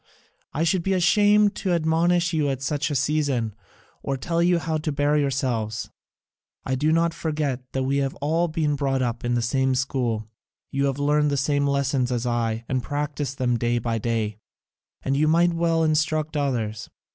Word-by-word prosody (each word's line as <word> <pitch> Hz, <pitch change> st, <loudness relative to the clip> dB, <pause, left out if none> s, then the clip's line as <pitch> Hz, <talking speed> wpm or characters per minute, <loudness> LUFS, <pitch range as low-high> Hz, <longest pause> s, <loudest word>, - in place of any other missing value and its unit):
I 155 Hz, -, -1 dB
should 170 Hz, +2 st, +2 dB
be 195 Hz, +3 st, 0 dB
ashamed 205 Hz, +3 st, +4 dB
to 185 Hz, -3 st, 0 dB
admonish 170 Hz, +1 st, +2 dB
you 150 Hz, -3 st, +1 dB
at 135 Hz, -1 st, -3 dB
such 145 Hz, +1 st, -1 dB
a 145 Hz, -, -2 dB
season, 135 Hz, -5 st, 0 dB, 0.5 s
or 135 Hz, -1 st, -2 dB
tell 170 Hz, +5 st, -1 dB
you 175 Hz, 0 st, +3 dB
how 160 Hz, -1 st, -2 dB
to 155 Hz, 0 st, -2 dB
bear 145 Hz, +1 st, +1 dB
yourselves: 125 Hz, -6 st, -1 dB, 0.7 s
I 130 Hz, -, -1 dB
do 150 Hz, +4 st, +1 dB
not 165 Hz, +1 st, +2 dB
forget 145 Hz, -6 st, -3 dB
that 135 Hz, -, 0 dB
we 135 Hz, +2 st, 0 dB
have 135 Hz, -1 st, -1 dB
all 160 Hz, +4 st, 0 dB
been 155 Hz, -2 st, 0 dB
brought 135 Hz, -2 st, 0 dB
up 120 Hz, -1 st, -3 dB
in 120 Hz, 0 st, 0 dB
the 120 Hz, -, 0 dB
same 130 Hz, +2 st, +1 dB
school, 125 Hz, -5 st, -1 dB, 0.4 s
you 140 Hz, +1 st, 0 dB
have 135 Hz, -1 st, -1 dB
learnt 150 Hz, +1 st, +2 dB
the 140 Hz, -, 0 dB
same 145 Hz, +1 st, +1 dB
lessons 135 Hz, -2 st, 0 dB
as 120 Hz, -1 st, -1 dB
I, 115 Hz, -1 st, -1 dB
and 130 Hz, -1 st, -1 dB
practised 145 Hz, -1 st, -3 dB
them 120 Hz, -2 st, 0 dB
day 120 Hz, +1 st, +1 dB
by 115 Hz, -1 st, -1 dB
day, 110 Hz, -2 st, -2 dB, 0.6 s
and 135 Hz, -, 0 dB
you 150 Hz, +2 st, +2 dB
might 170 Hz, +2 st, +3 dB
well 165 Hz, -1 st, +1 dB
instruct 155 Hz, 0 st, 0 dB
others. 115 Hz, -7 st, -2 dB
140 Hz, 185 wpm, -24 LUFS, 125-160 Hz, 0.7 s, ashamed